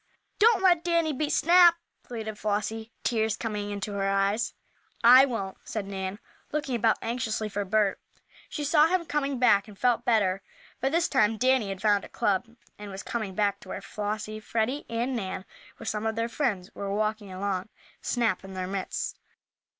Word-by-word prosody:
"Don't 425 -3 +5
let 350 -3 +5
Danny 335 -3 +1
beat 300 +2 -1
Snap!" 345 0 +6 0.3
pleaded 220 -3 -6
Flossie, 215 +2 -2
tears 220 -2 +1
coming 210 -3 -3
into 205 +1 -4
her 195 -1 0
eyes. 195 +3 +1 0.5
"I 255 +3 +9
won't," 200 -7 -4
said 215 -3 -4
Nan, 190 0 -4 0.3
looking 290 -3 -2
about 225 -1 +3
anxiously 225 -2 -2
for 205 0 -2
Bert. 205 0 +1 0.5
She 295 - -4
saw 300 +1 +5
him 360 0 0
coming 280 -3 -1
back, 210 -4 +4
and 205 -2 -13
felt 240 0 +2
better. 200 -5 +2 0.4
By 270 - +1
this 335 +3 +2
time 225 -4 +2
Danny 255 -3 +2
had 195 -1 -6
found 205 -2 +3
a - - -10
club, 200 +3 0 0.3
and 210 -1 -7
was 195 0 -7
coming 215 -5 -4
back 205 -1 +1
to 185 - -14
where - - -4
Flossie, 215 +1 -4
Freddie 230 +6 -2
and 235 +3 -1
Nan, 190 -3 -4 0.3
with 225 - -9
some 215 +1 -1
of 220 - -1
their 230 0 0
friends, 210 -8 -2
were 200 -1 -4
walking 215 -1 -1
along, 190 +1 -3 0.3
Snap 230 -7 0
in 190 0 -9
their 185 0 -2
midst. 190 0 -4
220 Hz, 180 wpm, -27 LUFS, 200-255 Hz, 0.5 s, I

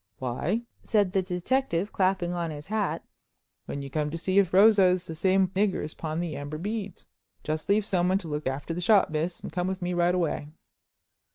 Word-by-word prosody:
"Why," 145 - -2 0.2
said 205 -4 +2
the 190 - +2
detective, 185 +2 -1
clapping 185 -2 +1
on 170 -2 -2
his 150 -1 -7
hat, 210 -1 -2 0.6
"when 140 - -4
you 135 - -8
come 150 0 -1
to 165 - -4
see 185 +4 +2
if 190 -3 +2
Rosa 200 +1 +6
is 180 -1 +2
the 165 - -7
same 190 +3 +2
nigger 195 +1 0
as 155 - -5
pawned 160 +1 -3
the 160 -4 -4
amber 145 +2 -5
beads. 205 +1 -5 0.4
Just 155 +3 -3
leave 205 0 +3
someone 185 -1 +2
to 180 - -7
look 150 -1 -3
after 140 +5 -3
the 175 - -3
shop, 200 -1 +4
miss, 160 +3 -2
and - - -7
come 180 +2 -1
with 190 0 -2
me 180 0 -1
right 175 +1 +2
away." 165 -4 -1
180 Hz, 205 wpm, -27 LUFS, 160-195 Hz, 0.6 s, Rosa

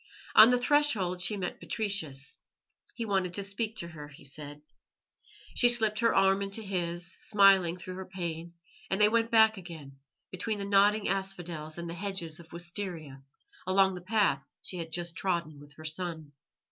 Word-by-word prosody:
On 220 +2 +9
the 250 - +4
threshold 245 -10 +2
she 190 +4 +1
met 180 -2 -4
Patricius. 160 -11 -2 0.6
He 230 - -4
wanted 190 -4 0
to 200 - 0
speak 210 +3 -2
to 170 -5 -4
her, 150 -3 -10
he 145 -1 -15
said. 145 +1 -8 0.9
She 245 - +4
slipped 220 -3 +5
her 230 0 +2
arm 195 0 +4
into 200 +3 -2
his, 175 -3 -3
smiling 195 -4 +4
through 185 +1 -8
her 190 - -6
pain, 170 -2 -6 0.3
and 190 - 0
they 210 0 +6
went 230 0 +1
back 220 -1 +5
again, 160 -7 -10 0.3
between 210 +4 -2
the 200 - -4
nodding 205 +1 +3
asphodels 175 -5 -3
and 170 0 -5
the 165 - -5
hedges 175 -3 -4
of 170 - -15
wisteria, 170 -5 -5 0.5
along 190 0 +3
the 180 - -7
path 190 -7 +1 0.2
she 185 - -4
had 165 -1 -6
just 175 +1 -2
trodden 170 -6 -2
with 145 +1 -15
her 155 - -13
son. 160 -2 -3
185 Hz, 170 wpm, -29 LUFS, 165-205 Hz, 0.9 s, On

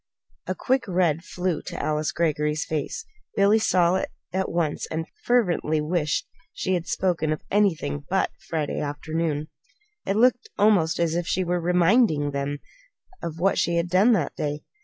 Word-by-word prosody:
A - - -1
quick 260 -2 0
red 175 -4 +1
flew 180 -3 -2
to - - -7
Alice 155 0 0
Greggory's 150 -2 0
face. 155 - -3 0.3
Billy 205 +2 +4
saw 180 -3 +3
it - - -2 0.2
at 190 0 0
once 165 -3 -1
and 160 0 -3 0.2
fervently 180 -10 +2
wished 155 0 0 0.3
she 185 - -1
had 175 -2 -1
spoken 170 -5 0
of 155 - -3
anything 185 -8 +1
but 190 +1 +1
that - - -35
Friday 155 -3 -1
afternoon. 155 +1 -2 0.6
It 195 - +1
looked 245 +2 +3
almost 200 -6 +3
as 170 -2 +1
if 170 0 -1
she 185 - +1
were 175 0 -1
reminding 175 - +3
them 140 +1 -2 0.6
of 165 -1 -5
what 190 +4 +2
she 170 0 +1
had 170 +1 0
done 200 +7 +5
that 170 -9 0
day. 150 0 -3
170 Hz, 165 wpm, -25 LUFS, 155-190 Hz, 0.6 s, done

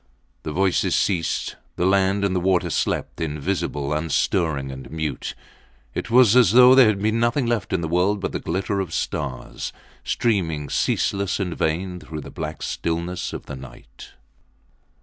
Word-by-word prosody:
The 75 - -5
voices 95 +3 +1
ceased. 85 -5 0 0.2
The 90 - 0
land 100 +1 +3
and 95 -1 0
the - - +2
water 90 -1 +1
slept - - -2
invisible, 75 -2 -2
unstirring 75 -2 0
and 65 0 -9
mute. 75 -4 -4 0.6
It - - -4
was 120 -2 +6
as 120 -6 +6
though 125 +1 +8
there 130 -3 +7
had 100 -2 0
been 110 +2 +1
nothing 120 +3 +1
left 115 -5 -1
in 90 - 0
the 80 - -2
world 90 +5 +1
but - - -3
the - - -3
glitter 95 +3 -2
of 90 -4 -3
stars 65 -5 -4 0.3
streaming, 85 - 0
ceaseless 100 0 0
and 90 -4 -2
vain, 90 +3 -1
through 80 -2 -7
the - - -10
black 75 0 -5
stillness 85 +2 -3
of - - -7
the - - -7
night. 65 -2 -13
90 Hz, 165 wpm, -23 LUFS, 80-100 Hz, 0.6 s, though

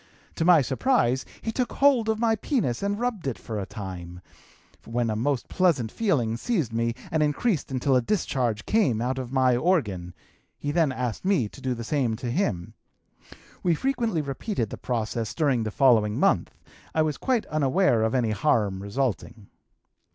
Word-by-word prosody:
To 165 - -1
my 170 -5 +6
surprise 130 - +1 0.2
he 225 - -1
took 250 +2 -2
hold 265 -6 +3
of 220 - +1
my 225 0 +2
penis 215 - -1
and 200 +1 -1
rubbed 235 - -2
it 130 - -2
for 110 -2 -5
a 95 - -5
time, 90 -3 -8 0.6
when 115 0 -1
a - - -1
most 125 +3 -1
pleasant 150 -12 +1
feeling 125 - 0
seized 160 - -1
me 115 +1 0 0.2
and 160 - +1
increased 150 - 0
until 130 +1 +1
a 125 - +4
discharge 120 - -1
came 195 - +2
out 130 +3 -1
of 125 -2 -6
my 130 -2 +3
organ; 105 - 0 0.4
he 145 - -3
then 160 -3 +2
asked 125 -4 -3
me 185 - +2
to - - -14
do 130 -1 -1
the 115 - -6
same 125 -3 0
to 120 +1 -4
him. 105 - -1 0.9
We 175 -2 +2
frequently 230 - -1
repeated 135 - -3
the - - -5
process 115 -2 -3
during 140 -7 +2
the 110 - -2
following 110 -4 +3
month; - - +1 0.4
I 160 - +4
was 155 -2 -1
quite 255 -4 0
unaware 150 -3 +2
of 110 +3 +1
any 120 -4 +1
harm 105 -5 +1
resulting. 115 -1 -3
130 Hz, 175 wpm, -26 LUFS, 115-180 Hz, 0.9 s, my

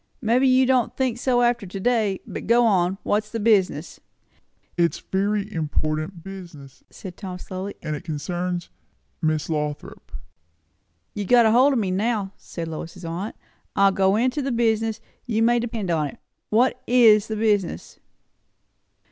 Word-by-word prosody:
"Maybe 250 +3 +2
you 260 0 +5
won't 255 -2 +1
think 255 -3 0
so 245 -1 +2
after 240 -4 +1
to 195 +2 -6
day. 215 -3 +1
But - - -7
go 235 +2 +5
on. 190 -3 +2
What's 210 +1 0
the 230 - -4
business?" 190 -8 +1 0.8
"It 170 -1 +2
is - - -8
very 205 +2 0
important 155 +2 -2
business," 170 -8 -11
said 180 -3 -10
Tom 185 -2 -7
slowly; 190 +2 -6
"and 155 - -2
it 145 - -8
concerns 175 +3 -4 0.5
Miss 155 -2 0
Lothrop." 150 -2 -4 1.0
"You 205 - -4
have - - -11
got 235 -3 +6
hold 260 +5 +5
of - - +1
me 200 -5 0
now," 200 0 -1
said 165 -1 -7
Lois's 165 +2 -7
aunt. 175 +6 -4 0.4
"I'll 195 0 +5
go 190 +1 +2
into 255 +6 +1
the 270 0 -2
business, 225 -1 0 0.3
you 225 -1 +1
may 240 +1 +4
depend 225 -6 -3
upon 155 -3 +1
it. - - -10 0.3
What 250 +3 +2
is 225 -4 +5
the 220 - -3
business?" 205 - -1
205 Hz, 160 wpm, -23 LUFS, 175-235 Hz, 1.0 s, got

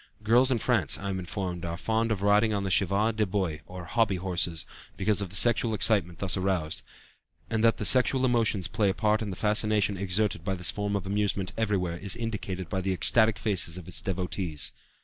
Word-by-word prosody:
Girls 120 +4 +4
in 130 - +2
France, 110 - +2
I 100 - -5
am 95 - -3
informed, 90 -1 -5
are 85 -1 -4
fond 110 +3 -1
of 100 -3 -2
riding 105 +2 +3
on 100 - -2
the 95 - -2
chevaux 100 +4 +2
de 110 -1 -1
bois, 95 -6 -2
or 90 -1 -9
hobby 110 +1 +1
horses, 85 -3 -2 0.3
because 100 0 +1
of 100 - -4
the 95 - -9
sexual 115 +1 +3
excitement 95 -5 +2
thus 95 -1 0
aroused; 95 -5 -2 0.7
and 110 -1 0
that 115 -1 +4
the 105 - -3
sexual 130 +2 +4
emotions 115 -6 +1
play 105 -3 0
a 95 - -1
part 110 0 +1
in 110 - -3
the 95 - -5
fascination 105 -1 +2
exerted 100 -1 0
by 95 0 -2
this 90 -3 +2
form 105 0 -3
of 100 -2 -3
amusement 100 -1 -1
everywhere 95 -6 -1
is 95 +2 -1
indicated 105 -6 -5
by 95 +3 -3
the 95 0 -1
ecstatic 110 +3 +2
faces 95 -5 0
of 90 - -10
its 90 - -3
devotees. 90 -5 -3
100 Hz, 210 wpm, -27 LUFS, 90-110 Hz, 0.7 s, Girls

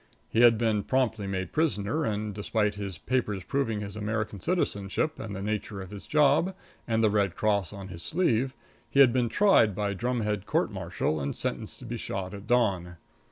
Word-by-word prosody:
He 115 - +3
had 120 -2 +7
been 110 -2 +1
promptly 115 -5 0
made 95 -1 -1
a - - -32
prisoner, 150 -2 0
and, 105 -1 -2
despite 105 +1 0
his 100 -3 -5
papers 105 -6 -1
proving 115 -5 -1
his 100 -1 -6
American 105 -1 -2
citizenship, 155 - -1
and 110 -3 -5
the 95 - -5
nature 105 -1 -3
of 95 0 -8
his 100 -1 -9
job, 150 +5 +3 0.3
and 115 -1 +1
the 110 - +4
red 100 -4 +1
cross 100 -4 +1
on 100 -1 -8
his 85 -2 -8
sleeve, 130 - +1 0.3
he 140 - +1
had 130 -4 +8
been 125 -2 +2
tried 115 - +4
by 100 0 -1
drumhead 105 -2 -1
court - - +1
martial 80 - -2
and 70 0 -3
sentenced - - -4
to - - -11
be - - -4
shot 95 0 -4
at 100 0 -9
dawn. 95 -8 +1
105 Hz, 195 wpm, -28 LUFS, 100-125 Hz, 0.3 s, had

